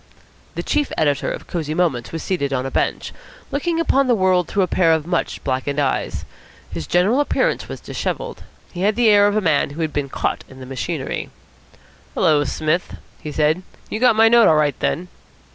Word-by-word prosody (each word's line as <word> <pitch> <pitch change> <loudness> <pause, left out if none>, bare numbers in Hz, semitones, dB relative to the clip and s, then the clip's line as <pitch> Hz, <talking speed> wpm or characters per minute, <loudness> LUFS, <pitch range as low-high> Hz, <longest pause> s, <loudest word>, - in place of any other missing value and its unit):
The - - -3
chief 295 -2 0
editor 145 -2 +1
of - - -6
Cosy 155 -3 -3
Moments 160 -9 0
was 165 - -5
seated 140 -7 -1
on 130 -1 -1
a 135 - -4
bench, - - -1 0.4
looking 330 +4 -1
upon 275 -5 +2
the 245 - +4
world 185 -3 +2
through 200 - +1
a - - 0
pair 170 -3 +3
of 160 -2 0
much 175 -1 -2
blackened 135 +2 -1
eyes. 135 -2 -1 0.5
His 80 - -5
general 195 +9 +3
appearance - - 0
was - - -6
dishevelled. 485 -1 -4 0.3
He 180 - -5
had 205 +2 +2
the 235 -1 +4
air 205 -1 +6
of 205 +1 +1
a - - +2
man 160 -7 +2
who 150 +4 -6
has 155 - -2
been 145 -2 -2
caught - - -2
in 130 - -13
the 130 - -8
machinery. 135 +2 -4 0.9
"Hullo, 150 -2 +3
Smith," 155 +5 -1 0.3
he 150 - -6
said. 155 +4 +1 0.3
"You 215 - -2
got 245 -2 +4
my 225 +1 +6
note 235 0 +6
all 160 - +5
right 150 -2 +1
then?" 180 +2 -1
170 Hz, 200 wpm, -20 LUFS, 145-215 Hz, 0.9 s, air